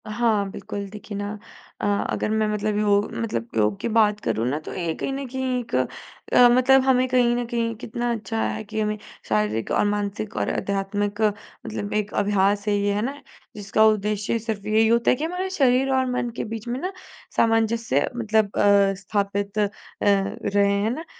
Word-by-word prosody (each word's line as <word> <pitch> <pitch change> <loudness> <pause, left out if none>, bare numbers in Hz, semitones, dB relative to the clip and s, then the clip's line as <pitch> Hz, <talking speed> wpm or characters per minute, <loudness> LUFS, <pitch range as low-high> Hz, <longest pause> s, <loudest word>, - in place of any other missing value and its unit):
हाँ, 215 -2 +1
बिल्कुल 200 +1 -6
देखिए 205 0 -8
ना 205 0 -3 0.5
अ, - - -1
अगर 205 +1 0
मैं 220 0 +1
मतलब 210 0 -1
योग 205 0 +2
मतलब 165 - -3
योग 105 -2 +2
की - - -2
बात 215 -2 +3
करूँ 115 - -1
ना, 145 +4 -1
तो 155 - -8
ये 170 -3 -2
कहीं - - -3
न 275 0 -4
कहीं 260 0 -2
एक 235 - -5 0.6
अ, 245 - +8
मतलब 255 +2 +5
हमें 260 -1 +3
कहीं 245 -1 +3
न 245 0 -1
कहीं 230 -1 -1
कितना 240 +2 -3
अच्छा 225 0 -3
है - - -2
कि 220 +1 -5
हमें 210 0 -1 0.3
शारीरिक 105 +1 0
और - - +2
मानसिक 205 +1 -2
और - - 0
आध्यात्मिक 200 +1 -2
मतलब 210 0 -3
एक 210 -1 -1
अभ्यास 205 0 +1
है 205 - +3
ये, 200 0 +1
है 205 - 0
ना? 275 +5 -4 0.3
जिसका 210 +1 +2
उद्देश्य 210 0 +1
सिर्फ़ 220 -2 -4
यही 220 +1 +4
होता 235 +1 +3
है - - +3
कि 290 - -5
हमारा 360 +3 -2
शरीर 270 -5 +3
और 260 0 +2
मन 250 -1 -1
के - - -2
बीच 225 +1 -6
में 245 +2 -2
ना, 365 +6 -3 0.5
सामंजस्य 225 - +2
मतलब 220 -3 +1
अ, 200 -1 +4
स्थापित 200 0 -2
अ, 205 -1 +2 0.3
रहे 200 0 +2
है 215 - +1
ना। 320 +3 -7
215 Hz, 190 wpm, -24 LUFS, 200-235 Hz, 0.6 s, अ